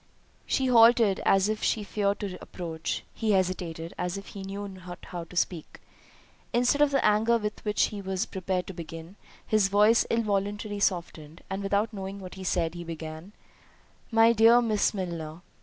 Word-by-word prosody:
She 265 - +1
halted, 230 -4 +5
as 195 0 +4
if 215 0 -2
she 215 - 0
feared 200 +1 -1
to 195 -3 -4
approach—he 175 +5 -3
hesitated, 175 -3 -1
as 180 +2 -2
if 195 - -9
he 200 - -8
knew 200 +1 -5
not 185 -2 -9
how 175 -1 -6
to 180 - -14
speak. 175 -2 -2 0.7
Instead 245 +4 +2
of 295 - +5
the 275 -2 +1
anger 220 +3 +4
with 210 -1 -5
which 210 -1 +1
he 205 -1 -6
was 190 -1 -2
prepared 185 -1 -3
to 190 - -8
begin, 165 +1 -9 0.3
his 215 -3 +3
voice 210 +3 +4
involuntarily 205 -1 -1
softened, 170 -4 -2
and 195 +1 -2
without 200 +3 0
knowing 195 0 -6
what 185 -2 -9
he 190 - -8
said, 170 -3 0
he 175 0 -7
began, 165 +3 -8 0.8
"My 225 0 +5
dear 230 +2 +6
Miss 220 -4 +1
Milner." 170 -5 -5
195 Hz, 170 wpm, -27 LUFS, 180-215 Hz, 0.8 s, dear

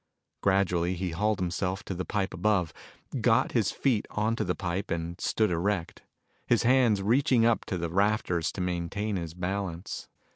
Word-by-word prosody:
Gradually, 95 -2 +2
he 90 0 -3
hauled 105 +5 +1
himself 90 +2 -2
to - - -4
the 95 +1 -3
pipe 100 -3 -1
above, 90 -3 +1 0.5
got - - +3
his - - +2
feet 120 -6 0
onto 110 +2 0
the 90 - -1
pipe 95 +1 -3
and 85 +1 -3
stood 110 -4 +1
erect, 85 0 -1 0.5
his 120 - +3
hands 120 -5 +4
reaching 125 +2 +3
up 115 -1 +2
to 95 - -2
the 85 0 -2
rafters 90 -4 +1
to 95 - -4
maintain 90 +4 -2
his 85 -2 -4
balance. 90 -1 -4
95 Hz, 160 wpm, -28 LUFS, 85-105 Hz, 0.5 s, hands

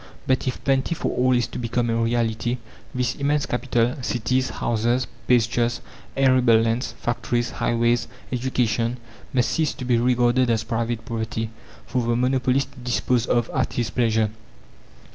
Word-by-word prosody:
But, 130 0 +1
if 125 - -3
plenty 135 +4 +1
for - - -2
all 130 +1 +3
is 120 -1 +2
to - - -7
become 120 0 0
a - - +1
reality, 115 +1 0 0.3
this 125 -1 -1
immense 145 +1 0
capital 120 0 0
cities, 125 +1 0
houses, 120 +2 0 0.2
pastures, 120 0 +2 0.4
arable 130 -4 +5
lands, 115 +2 0
factories, 120 0 -2
highways, 120 0 +1 0.2
education 120 -2 0 0.3
must 125 -4 +1
cease 160 -2 0
to 130 - -6
be 120 -2 +3
regarded 125 +1 +3
as 115 -2 +1
private 115 0 -2
property, 115 -1 -3 0.3
for 125 - -1
the 115 0 +1
monopolist 130 +2 +1
to 140 - -15
dispose 120 0 0
of 120 -1 +1
at 130 - 0
his 120 -2 -1
pleasure. 110 -3 +1
120 Hz, 150 wpm, -23 LUFS, 115-130 Hz, 0.4 s, arable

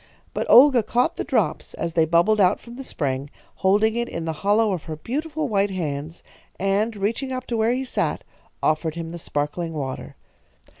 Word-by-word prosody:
But - - -3
Olga 260 -1 +8
caught 240 +3 0
the - - -1
drops - - -1
as 170 -1 -3
they 160 -1 +4
bubbled 175 +6 +3
out 185 +1 +4
from 235 0 -12
the 270 - -7
spring, 140 - -3 0.3
holding 210 +4 +3
it 235 0 -1
in 165 -1 -4
the 160 - -2
hollow 210 +2 +3
of 175 - -5
her 160 - -5
beautiful 300 - -3
white 205 -3 +1
hands, 155 -3 -4 0.4
and, 200 +4 +1
reaching 225 +7 -2
up 255 -1 -4
to 235 - -2
where 220 +1 +2
he 260 +1 -2
sat, - - -1 0.4
offered 155 +1 +1
him 165 -1 -5
the 170 - -7
sparkling 160 +3 -3
water. 135 -3 -5
195 Hz, 190 wpm, -23 LUFS, 165-235 Hz, 0.4 s, Olga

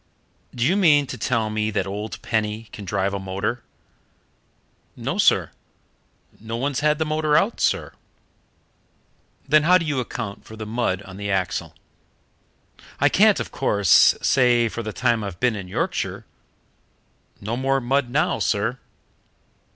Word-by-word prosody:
"Do 120 0 0
you 175 +7 +3
mean 155 -8 +4
to - - -6
tell 115 -4 -1
me 105 0 -1
that 100 -3 -1
old 105 +3 -5
Penny 110 0 -2
can 105 - -8
drive 95 +2 -1
a 100 - -2
motor?" 100 +5 -3 1.3
"No, - - -4
sir; - - +3 0.9
no 115 +2 -5
one's 135 +2 -1
had 150 +1 +2
the 160 - -1
motor 155 -1 +1
out, 210 +4 0
sir." - - 0 1.5
"Then 155 +2 +5
how 180 +4 +5
do 165 - -3
you 145 -4 -1
account 115 -4 -5
for 110 - -12
the 110 0 -7
mud 105 -4 -2
on 95 -1 -11
the 100 0 -4
axle?" 95 -3 -2 1.2
"I - - +4
can't, - - +4
of - - -5
course, 100 -4 +4
say 120 -3 +3
for 115 - -5
the 110 -1 -5
time 120 -1 0
I've 95 -4 -6
been 125 -3 +1
in 100 -3 -7
Yorkshire. 90 - -3 1.1
No 110 +3 -3
more 135 +2 +1
mud 135 +1 0
now, 155 +7 0
sir." 115 +5 0
115 Hz, 150 wpm, -22 LUFS, 105-135 Hz, 1.5 s, Then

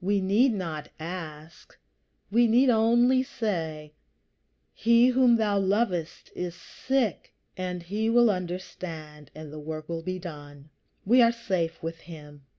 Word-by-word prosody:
We 200 +2 +1
need 210 +7 +3
not 165 -6 -5
ask, 160 -1 -9 0.5
we 235 +2 +4
need 250 +3 +4
only 240 +3 +4
say, 165 - -4 0.8
"He 235 +2 +4
whom 250 -1 +4
thou 210 -3 +1
lovest 190 -4 -1
is 180 -1 -4
sick," 260 0 -2 0.2
and 180 -1 -4
he 210 +5 -2
will 240 -1 +5
understand, 170 -5 -7
and 155 -1 -9
the 155 - -7
work 155 0 -6
will 165 -1 -4
be 185 +2 -4
done. 145 -4 -10 0.3
We 245 +5 +5
are 230 -1 +6
safe 185 -9 -3
with 165 0 -5
him. 150 -4 -12
185 Hz, 140 wpm, -27 LUFS, 160-230 Hz, 0.8 s, are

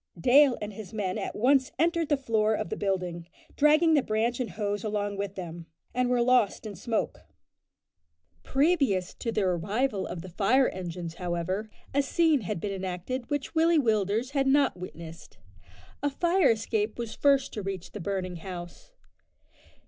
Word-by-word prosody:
Dale 265 - +5
and 210 0 -5
his 220 +1 -9
men 190 -4 -2
at - - -4
once 260 +3 +3
entered 335 +1 +1
the 290 - +3
front 270 - -22
door 220 -1 +3
of 170 - -3
the - - -2
building, 180 -4 -2 0.3
dragging 310 +3 +5
the 295 - +5
branch 230 +2 0
and 250 - -2
hose 205 -1 -3
along 205 -1 -2
with 200 0 -4
them, 170 -2 -7 0.3
and 250 0 +1
were 245 -1 +3
lost 245 -4 +2
in 210 -2 -6
smoke. 220 +5 -2 1.2
Previous 270 - +1
to 230 - -4
the 215 -2 0
arrival 195 +5 0
of 165 - -6
the 185 - -8
fire 230 +9 +3
engines, 175 -2 -6
however, 180 +4 -3 0.2
a 280 - +3
scene 310 0 +2
had 200 -1 -3
been 200 +3 -3
enacted 190 +7 -4
which 290 +1 -2
Willie 330 0 +4
Willders 220 -1 +1
had 275 -1 +1
not 275 0 +3
witnessed. 170 -2 -10 0.6
A 290 - +1
fire 345 +3 +2
escape 215 -1 0
was 235 -2 -4
first 275 -2 +2
to 210 - -4
reach 190 -2 -5
the 210 - -7
burning 185 -1 -3
house. 175 - -9
215 Hz, 170 wpm, -28 LUFS, 185-270 Hz, 1.2 s, Dale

